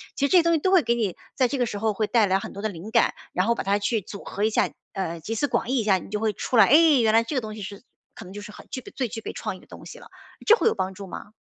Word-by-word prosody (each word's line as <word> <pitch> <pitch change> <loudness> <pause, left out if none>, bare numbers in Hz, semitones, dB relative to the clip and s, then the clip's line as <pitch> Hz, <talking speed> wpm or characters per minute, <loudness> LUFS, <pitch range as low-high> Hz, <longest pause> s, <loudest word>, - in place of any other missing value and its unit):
其 280 - +1
实 - - -8
这 370 - +7
些 340 - +6
东 335 0 +3
西 320 - +2
都 375 +5 +1
会 365 -5 +5
给 235 - +2
你 215 -7 -1 0.2
在 255 -2 +3
这 275 - -3
个 245 - +1
时 205 -3 -5
候 220 -1 0
会 215 +1 0
带 220 -1 +3
来 190 0 +2
很 - - -7
多 200 - -7
的 215 - -1
灵 195 +4 -9
感， - - +3 0.2
然 185 +4 +1
后 235 - +3
把 - - -3
它 200 +1 +1
去 215 +2 0
组 200 +2 -10
合 205 - -4
一 220 - +3
下， - - +1 0.2
呃， 170 -4 -3
集 220 +8 -4
思 290 - 0
广 230 - -1
益 265 - +1
一 - - 0
下， 195 -3 +3
你 185 - -10
就 210 0 -2
会 220 -1 0
出 245 - -2
来。 - - +8
诶， 305 -1 +6
原 220 -1 +3
来 230 +1 +5
这 285 - -5
个 255 - +1
东 215 -1 -7
西 210 - -8
是 200 +1 -7 0.4
可 220 - -11
能 185 - -11
就 205 - -7
是 210 - -10
很 - - -14
具 255 - -5
备 - - -12
最 255 -3 -1
具 225 +1 -7
备 - - -6
创 - - -4
意 - - -13
的 - - -20
东 - - -12
西 - - -10
了， - - -14 0.4
这 450 - +7
会 - - +1
有 - - +2
帮 190 +1 -2
助 195 0 -9
吗？ 205 - -9
220 Hz, 390 characters per minute, -25 LUFS, 200-250 Hz, 0.4 s, 来